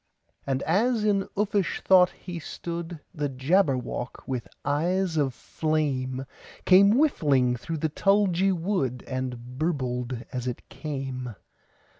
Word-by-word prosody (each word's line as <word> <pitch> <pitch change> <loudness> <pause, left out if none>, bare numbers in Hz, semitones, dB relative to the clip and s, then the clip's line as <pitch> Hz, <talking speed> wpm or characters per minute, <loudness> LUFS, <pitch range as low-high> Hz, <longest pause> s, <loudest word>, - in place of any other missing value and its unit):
And 135 0 0
as 220 +6 +2
in 200 -2 +2
uffish 200 -4 0
thought 180 -1 +6
he 180 -2 -8
stood, 170 +1 -6
The 150 -4 -2
Jabberwock, 130 -3 0
with 125 -3 -3 0.2
eyes 175 +5 +1
of 145 -4 +2
flame, 135 -3 -2 0.4
Came 200 +2 +7
whiffling 140 - +3
through 160 +7 -4
the 155 +1 0
tulgey 195 +2 +3
wood, 165 - -1
And 125 -1 -5
burbled 125 -6 -2
as 125 -1 -3
it 125 - -5
came! 135 -6 -5
155 Hz, 120 wpm, -26 LUFS, 130-185 Hz, 0.4 s, Came